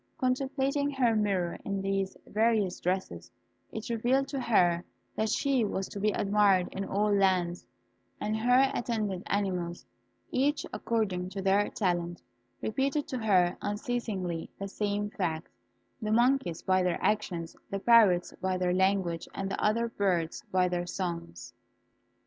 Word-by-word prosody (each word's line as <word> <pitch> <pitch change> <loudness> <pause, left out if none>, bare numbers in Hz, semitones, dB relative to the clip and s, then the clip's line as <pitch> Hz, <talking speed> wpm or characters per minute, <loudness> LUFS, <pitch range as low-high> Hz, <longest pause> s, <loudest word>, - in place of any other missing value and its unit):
Contemplating 270 +2 0
her 250 -5 +2
mirror 195 -5 0
in 200 0 -2
these 195 0 -1
various 215 -4 +1
dresses, 180 - -2 0.4
it 220 - -6
revealed 245 +4 +1
to 275 - -3
her 175 -8 +3 0.3
that 220 0 0
she 265 +2 +2
was 195 -2 -2
to 200 - -7
be 210 +2 +2
admired 200 -3 +3
in 195 - -4
all 205 +2 +1
lands; 185 -3 +1 0.5
and 215 +1 -1
her 250 +4 +4
attendant 215 -7 -2
animals, 180 -4 -2 0.5
each 290 +4 +1
according 195 -6 -1
to 195 +1 -6
their 195 +2 +2
talent, 175 -3 -1 0.4
repeated 275 +6 0
to 255 - -3
her 185 -5 +3
unceasingly 205 - -3
the 195 - -4
same 205 +1 -2
fact 165 -6 -2 0.5
the 215 -1 -2
monkeys 235 -7 +2
by 185 0 +3
their 180 -1 +1
actions, 180 -6 -1
the 195 - -2
parrots 200 -5 +5
by 190 0 0
their 180 -1 +1
language, 190 -3 +1
and 195 0 -3
the - - -3
other 230 +2 +2
birds 185 -7 -1
by 185 -1 +3
their 175 0 -2
songs. 170 - -5
200 Hz, 145 wpm, -29 LUFS, 180-230 Hz, 0.5 s, parrots